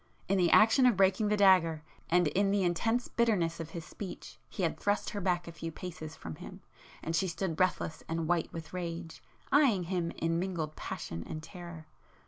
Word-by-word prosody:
In 195 0 +2
the 175 -2 +4
action 225 +7 +6
of 235 -6 +3
breaking 195 +2 +3
the 210 0 +2
dagger, 180 -6 +5 0.3
and 175 -1 +4
in 195 +6 +2
the 200 -1 +2
intense 225 +8 +1
bitterness 190 -8 +1
of 165 -1 -5
his 165 -1 -7
speech 190 +4 -8
he 190 - -4
had 165 - 0
thrust 205 0 0
her 205 - -4
back 175 -2 0
a - - -6
few 165 0 -6
paces 160 -2 -7
from 80 -1 -8
him, - - -10 0.4
and 165 - -2
she 185 +3 +1
stood 170 0 -2
breathless 185 -3 0
and 165 0 -1
white 170 -1 +1
with 160 -1 -8
rage, 170 -2 -5 0.3
eyeing 265 -11 +4
him 175 -1 -1
in 165 0 0
mingled 170 -5 -3
passion 85 0 -5
and 155 0 -6
terror. 170 -2 -9
175 Hz, 195 wpm, -31 LUFS, 165-195 Hz, 0.4 s, action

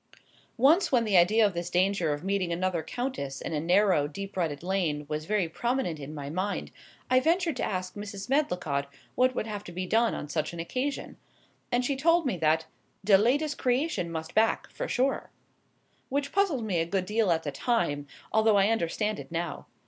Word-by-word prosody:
Once 305 +10 +4
when 245 -3 +4
the 210 -3 +1
idea 210 +6 +5
of 200 - +1
this 170 0 -3
danger 180 -2 +2
of 145 +2 -3
meeting 195 -2 0
another 175 0 0
countess 160 - -4
in - - -5
a 150 - 0
narrow, 180 -2 +3
deep 195 +6 -7
rutted 165 -5 -2
lane 175 -6 -1
was 155 +1 -3
very 210 -4 +1
prominent 235 - -2
in 140 +1 -7
my 140 -2 -6
mind 185 +7 -3 0.4
I 255 - +6
ventured 330 +2 +1
to - - -2
ask 185 -1 -2
Mrs. 205 -1 -7
Medlicott 180 - 0 0.3
what 255 0 +2
would - - -1
have 210 -2 -5
to - - -8
be 185 +2 -3
done 225 +4 +2
on - - -5
such 155 +2 -2
an 170 - -7
occasion; 255 +11 -3 0.5
and 245 +1 +1
she 280 - 0
told 330 +4 +3
me 255 - 0
that 160 0 +2 0.4
"de 200 -1 +7
latest 280 +9 +2
creation 250 - 0
must 160 -1 -5
back, 220 +1 +2
for - - -4
sure," 270 +2 0 0.8
which 280 +1 -1
puzzled 355 - +1
me 185 -6 0
a 165 - +1
good 190 +1 -1
deal 215 0 +1
at 165 -1 +1
the 145 - -3
time, 145 - 0 0.3
although 220 -1 +4
I 200 +1 +4
understand 215 0 0
it - - -10
now. 170 -2 -4
195 Hz, 195 wpm, -28 LUFS, 165-245 Hz, 0.8 s, de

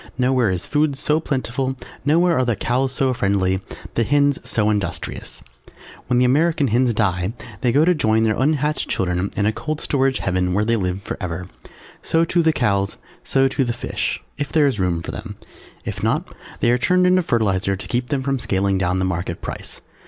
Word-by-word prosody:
Nowhere 125 -3 +2
is 90 -1 -2
food 150 -1 +1
so 150 +3 +1
plentiful, 130 -2 -2 0.3
nowhere 165 +4 +3
are - - +3
the 120 -3 +1
Cows 130 +6 0
so 130 -1 +1
friendly, 95 -4 +1 0.3
the 115 - +1
Hens 145 +2 +2
so 110 -1 +1
industrious. 105 -2 -3 0.6
When 125 - +2
the 125 - +4
American 145 +1 +2
Hens 120 +2 +3
die 95 -2 0 0.3
they 125 - +2
go 145 +6 +4
to 180 - +4
join 110 -8 +2
their 110 -1 +2
unhatched 150 +2 0
children 90 +1 0
in 100 - +2
a 110 - +2
cold 155 +5 -3
storage 135 -1 +1
Heaven 90 -1 0
where 105 +1 +2
they 115 +1 +2
live 95 -2 -2
forever. 90 -2 -5 0.5
So 165 0 +2
too 170 +1 +2
the 160 -1 +4
Cows, 100 -8 0 0.3
so 135 0 +3
too 135 +1 0
the 120 -2 -1
Fish, 120 - -3 0.2
if 145 - -3
there 155 -2 +4
is 135 -7 0
room 85 -3 0
for - - -5
them; 110 -1 -7 0.5
if - - -4
not - - 0 0.3
they 120 - +4
are 125 - +2
turned 180 +7 +3
into 185 0 +4
fertilizer 100 - +1
to 95 - -8
keep 125 0 -1
them 135 -1 -1
from 135 0 0
scaling 95 -2 0
down 90 -1 +1
the 95 - 0
market 85 -1 -3
price. - - -7
120 Hz, 195 wpm, -21 LUFS, 100-140 Hz, 0.6 s, the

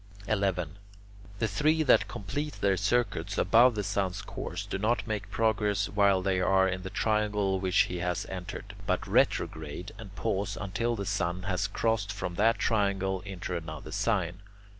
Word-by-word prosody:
11. 95 -4 -1 0.6
The 115 - +1
three 155 +6 +2
that 110 -7 +5
complete 145 +10 -4
their 100 -1 +1
circuits 100 -2 0
above 115 +5 +5
the 105 - -1
sun's 95 -1 -1
course - - -5
do - - -4
not 110 +4 +1
make 105 -2 -3
progress 105 -2 +1
while 100 -2 +3
they 95 -1 +1
are 95 +1 +4
in 95 0 -2
the 95 - -6
triangle 105 -3 +1
which 95 -1 +3
he 90 - -1
has 90 0 -1
entered, 95 +2 -7
but 90 -2 0
retrograde 80 +5 0
and 100 -3 -10
pause 95 +2 -1
until 115 +4 -1
the 100 -2 -4
sun 90 -3 -1
has 95 +1 0
crossed 105 0 0
from 95 -3 -4
that 110 +5 +3
triangle 95 -3 +1
into 90 -2 -4
another 80 -2 -6
sign. 95 -2 0
100 Hz, 160 wpm, -29 LUFS, 95-105 Hz, 0.6 s, that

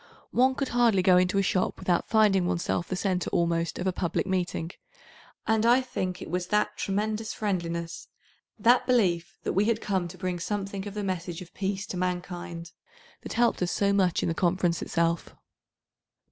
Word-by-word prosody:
One 260 +2 +3
could 275 -1 -2
hardly 235 -6 +3
go 180 -1 +6
into 180 +2 +2
a 195 - +3
shop 185 0 0
without 175 -2 0
finding 205 -5 +4
oneself 175 -1 -1
the 185 - -2
centre 185 -1 -1
almost 170 -1 0
of - - -3
a 190 - +2
public 175 -2 -1
meeting, 180 -3 -2 0.7
and 220 -1 +2
I 240 +2 +6
think 185 -8 -3
it - - -9
was 180 0 -1
that 210 +2 +1
tremendous 215 +2 -2
friendliness, 170 -5 -3 0.5
that 245 +2 +4
belief 180 -9 +1
that - - -1
we 200 +2 +3
had 225 0 +1
come 190 -5 -1
to 180 +2 -11
bring 180 0 -3
something 200 +1 -3
of 205 - -7
the 210 - -2
message 180 -2 -3
of 175 - -18
peace 195 0 -2
to 185 - -5
mankind, 175 -1 -4 0.5
that - - -6
helped 235 -3 +2
us 180 - 0
so 200 0 +2
much 185 -3 +2
in - - +1
the - - 0
Conference 175 0 +1
itself. 170 0 -1
185 Hz, 185 wpm, -27 LUFS, 175-210 Hz, 0.7 s, go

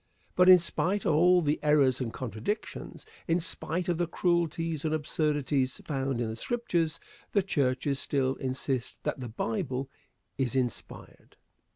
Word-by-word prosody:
But 180 0 +6
in 185 - +11
spite 185 +3 -1
of 160 - +3
all 180 +3 +5
the 150 0 +1
errors 140 -4 +3
and 120 -3 -2
contradictions, 125 - -5 0.2
in 170 0 +2
spite 170 0 -3
of 175 -2 0
the 175 - +1
cruelties 165 -3 0
and 155 0 +1
absurdities 145 -3 0
found 135 -3 -1
in 120 - 0
the 110 - -4
Scriptures, 170 - -1 0.3
the 200 - +3
churches 140 -4 0
still 135 -2 0
insist 130 -1 -3
that - - -2
the 125 -2 -5
Bible 125 +4 -3 0.5
is 130 -1 0
inspired. 125 -4 -4
150 Hz, 150 wpm, -29 LUFS, 130-170 Hz, 0.5 s, in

